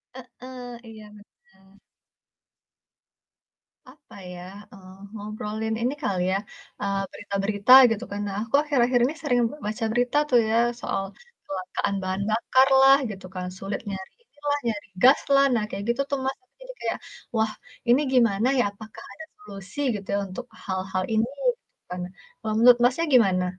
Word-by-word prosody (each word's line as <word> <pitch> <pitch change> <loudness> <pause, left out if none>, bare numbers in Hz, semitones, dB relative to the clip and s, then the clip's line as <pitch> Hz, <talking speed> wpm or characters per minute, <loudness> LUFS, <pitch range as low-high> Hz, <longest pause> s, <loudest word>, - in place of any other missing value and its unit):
Heeh, 255 -1 -10 0.2
iya 215 -1 -11
bener. 205 0 -19 2.5
Apa 290 +2 -18 0.2
ya? 175 - -9 0.3
Eee, 185 -2 -14 0.2
ngobrolin 215 +1 -4
ini 250 +3 0
kali 185 -4 0
ya, 195 - +2 0.4
eee, 200 -1 -1
berita-berita, 200 +3 -1 0.2
gitu 225 +2 -2
kan. 205 - -4
Nah, 195 - -4
aku 230 +3 -1
akhir-akhir 255 -4 +2
ini 275 - -1
sering 250 -6 +1
be - - -9
baca 225 +2 -2
berita 245 +4 +1
tuh 245 - +5
ya 225 - +1 0.2
soal 195 - -2
kecelakaan 200 - -5
bahan 185 +1 -2
bakar 260 +4 +3
lah 270 +1 +8
gitu 195 -3 -8
kan, 180 - -4
sulit 195 +1 -4
nyari 190 -1 -6
inilah 290 -7 -3
nyari 215 -3 -3 0.2
gas 265 +3 +7 0.2
lah, 275 - +6
nah 225 -3 +1
kayak 200 +1 -5
gitu 240 +3 +1
tuh 280 - 0
Mas. 265 - -2 0.2
Jadi - - -10
kayak, - - -2 0.4
"Wah, 220 -1 +1 0.4
ini 250 +4 +5
gimana 230 -3 +3
ya, - - +4
apakah 215 +2 -12
ada 320 - -10
solusi 200 - -11 0.2
gitu 200 -1 -7
ya - - +1
untuk 190 +7 -7 0.2
hal-hal 190 -1 -2
ini?" 220 +2 +1 0.2
Gitu - - -3
kan. 180 0 -4 0.4
Kalo, 215 - -4
menurut 240 +1 +7
Masnya 260 +7 +2
gimana? 190 -7 +4
225 Hz, 160 wpm, -25 LUFS, 200-255 Hz, 2.5 s, lah